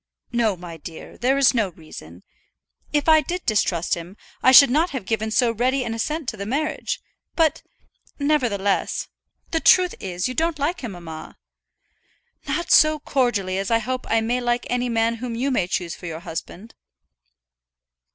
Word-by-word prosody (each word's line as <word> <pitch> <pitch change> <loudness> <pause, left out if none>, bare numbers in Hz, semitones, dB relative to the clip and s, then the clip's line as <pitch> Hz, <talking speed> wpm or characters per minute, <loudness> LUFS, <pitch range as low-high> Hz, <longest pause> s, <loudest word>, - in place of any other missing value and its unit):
"No, 225 -5 +1
my 170 -2 -9
dear; 160 +1 -10
there 265 +3 +1
is 275 -2 +5
no 225 -5 +1
reason. 95 - -12 0.7
If 295 0 0
I 315 -1 +6
did 350 +5 -5
distrust 190 -6 +1
him, 175 +4 -5 0.2
I 260 - +6
should 265 0 +9
not 320 +6 +2
have 260 - -5
given 220 +1 -1
so 235 +1 +2
ready 255 +4 0
an 230 - -3
assent 300 +6 -3
to 215 - -7
the 200 - -5
marriage. 305 +6 -2 0.4
But, 320 -2 +2 0.6
nevertheless 245 -10 0 0.2
" - - -41
"The 325 - +1
truth 360 +2 +5
is, 180 -1 -3
you 255 - -4
don't 325 +2 0
like 305 +6 -1
him, 235 -6 -5
mamma." 165 -3 -9 1.1
"Not 345 0 -2
so 310 0 +6
cordially 240 -10 0
as 195 - -3
I 230 - +4
hope 255 +3 -4
I 225 0 +3
may 240 +3 -1
like 240 0 0
any 245 0 0
man 230 0 +1
whom 235 0 -5
you 265 +4 -1
may 190 -9 +1
choose 175 -2 -2
for 175 - -9
your 165 0 -6
husband." 180 +6 -8
235 Hz, 175 wpm, -23 LUFS, 195-275 Hz, 1.1 s, should